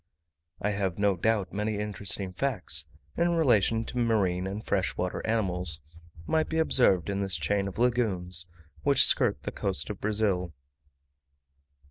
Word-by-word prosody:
I 105 - 0
have 95 -3 -2
no 100 -1 +2
doubt 100 -1 0
many 105 +1 -1
interesting 100 -2 -1
facts, 90 - -1 0.3
in 170 0 +2
relation 115 - +3
to 125 - -4
marine 95 -6 +1
and 100 +3 -5
fresh 95 -2 0
water 90 0 -2
animals, 90 -7 0 0.4
might 160 - +1
be 160 - -2
observed 125 - +3
in 100 0 -2
this 95 -3 +1
chain 100 +5 0
of 95 - -7
lagoons, 95 -8 0 0.3
which - - +5
skirt - - +2
the - - -4
coast 75 - -2
of 105 - -9
Brazil. 100 -6 0
100 Hz, 145 wpm, -28 LUFS, 90-110 Hz, 0.4 s, which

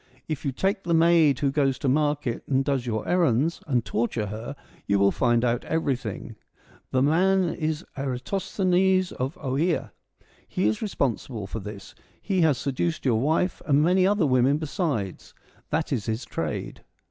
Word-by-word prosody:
If 155 -1 -4
you 140 - -1
take 195 +8 -1
the 170 -2 0
maid 165 -4 +5
who 140 -1 +1
goes 135 -2 +1
to - - -3
market 145 -3 0
and 135 -1 +1
does 135 -4 -1
your 110 -2 -2
errands, 165 -3 +2
and 125 -5 +1
torture 115 -1 -1
her, 110 +7 -6 0.3
you 100 - +3
will 100 0 +4
find 120 0 +2
out 120 0 0
everything. 135 -9 -2 0.5
The 130 0 +2
man 180 +4 +3
is 155 +1 -3
Eratosthenes, 185 +7 0
of 130 +5 -3
Oea: 150 +5 -1 0.6
he 100 - 0
is 110 - 0
responsible 125 - -2
for 105 +3 -5
this; 105 0 -9 0.3
he 190 -3 0
has 155 -5 +3
seduced 145 +5 -2
your 115 -4 +3
wife 160 +6 0
and 145 0 +4
many 185 +3 +4
other 200 -4 +2
women 130 +1 +3
besides: 150 - -3 0.3
that 155 -1 -1
is 110 -7 -2
his 110 +4 -2
trade. 80 -2 -4
140 Hz, 160 wpm, -25 LUFS, 120-165 Hz, 0.6 s, maid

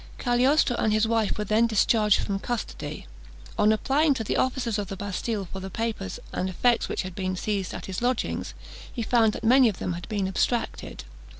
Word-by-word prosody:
Cagliostro 250 +2 +3
and 215 - +1
his 215 +1 +2
wife 225 -2 +1
were 210 - -1
then 215 +3 +3
discharged 215 -1 +3
from 195 -1 -2
custody. 240 +3 -5 0.5
On 210 +1 +4
applying 280 +7 +2
to 225 - -2
the - - -2
officers 245 -4 0
of 200 - -3
the 195 - -6
Bastille 205 +1 -3
for 190 - -4
the 190 0 -6
papers 225 - -3
and 185 - -1
effects 235 +6 +1
which - - -2
had 185 -1 -7
been 185 0 -2
seized 195 0 -2
at - - -7
his 190 +1 -5
lodgings, 245 0 -1 0.4
he 235 - -4
found 225 -2 +3
that - - -7
many 250 +1 +6
of 200 - -5
them 180 - -3
had 175 +4 -7
been 205 -3 -1
abstracted. 230 +5 -2
220 Hz, 200 wpm, -26 LUFS, 195-240 Hz, 0.5 s, many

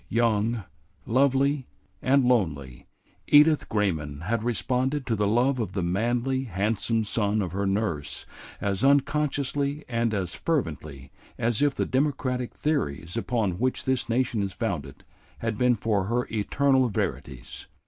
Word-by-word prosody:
Young, 115 -1 +1 0.4
lovely, 135 +2 +2 0.3
and 135 +1 +3
lonely, 75 - 0 0.4
Edith 150 +1 +5
Grayman 80 -9 -1
had 110 +5 -1
responded 130 +4 0
to 115 - 0
the 105 -1 +1
love 125 +5 +2
of 100 -5 -3
the 95 -2 -1
manly, 120 +8 0
handsome 110 +2 0
son 105 0 0
of 95 -5 -2
her 100 +2 -1
nurse 85 -9 -1 0.3
as 100 +1 -1
unconsciously 140 +1 +1
and 115 -1 0
as 90 -3 -2
fervently 75 - -3 0.3
as 115 +1 0
if 145 -2 +2
the - - 0
democratic 130 -3 -1
theories 85 - -2
upon 110 -6 -1
which 130 +1 0
this 130 -2 0
nation 120 -2 +1
is 100 -1 -3
founded 85 - -4 0.3
had 115 -1 -2
been 125 +2 +3
for 105 -3 0
her 120 +4 0
eternal 130 +4 +2
verities. 70 - -4
115 Hz, 140 wpm, -26 LUFS, 100-130 Hz, 0.4 s, Edith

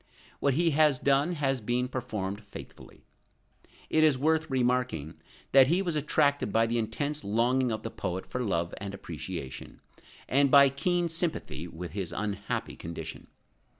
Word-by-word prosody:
What 140 -2 +2
he 165 +1 +3
has 150 -2 +4
done, 140 +6 +2
has 135 -5 0
been 120 +3 0
performed 105 -6 -4
faithfully. 100 - -12 0.8
It 155 - +3
is 150 -4 +5
worth 160 +3 +1
remarking 125 - -1 0.3
that 135 -1 +7
he 175 +6 +2
was 170 -4 -1
attracted 145 -4 +1
by 115 +2 +3
the 115 +1 0
intense 145 +7 -2
longing 120 +4 +1
of 110 -1 -3
the 115 - -5
poet 90 +1 -4
for 125 - -4
love 85 -7 -1
and 100 -1 -5
appreciation, 85 -5 -7 0.5
and 140 +1 +3
by 140 0 +8
keen 175 +5 0
sympathy 165 - -3
with 85 +1 -7
his 95 -4 -4
unhappy 100 0 -3
condition. 80 -1 -7
125 Hz, 150 wpm, -29 LUFS, 100-145 Hz, 0.8 s, by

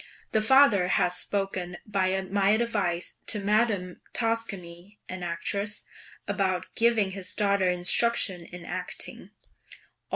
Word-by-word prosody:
The 220 - +2
father 220 -6 +5
has 180 -1 +2
spoken 185 -2 -3
by 190 -2 0
my 195 +1 0
advice 205 -6 0
to 215 - +4
Madame 205 -3 0
Toscani 205 -5 -4
(an 185 0 -7
actress) 200 +5 0 0.4
about 185 -2 -1
giving 225 -4 +2
his 190 -1 -2
daughter 200 -2 +2
instruction 180 +1 +3
in 175 0 -11
acting. - - -5
195 Hz, 110 wpm, -27 LUFS, 180-215 Hz, 0.4 s, father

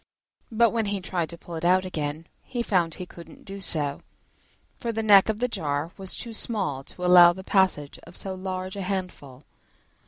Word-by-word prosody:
But 230 0 +4
when 225 -2 -1
he 200 0 -1
tried 180 -3 -3
to 170 - -6
pull 170 - -11
it 160 0 -5
out 185 +2 +3
again, 155 -2 -4 0.2
he 240 -2 -4
found 175 -7 +1
he 180 - -7
couldn't 170 -1 -14
do 195 0 -8
so, 150 -6 +1 0.8
for 235 - -2
the 225 0 -3
neck 205 -1 +6
of 215 - 0
the 250 +3 0
jar 150 -6 -2
was 190 -1 -1
too 235 -1 -6
small 195 - -1
to 180 - -7
allow 180 -1 +9
of 175 - -1
the 190 - -9
passage 185 -8 +1
of 170 - -13
so 195 - -5
large 185 0 -5
a 200 - -4
handful. 180 -8 -5
185 Hz, 205 wpm, -25 LUFS, 165-200 Hz, 0.8 s, allow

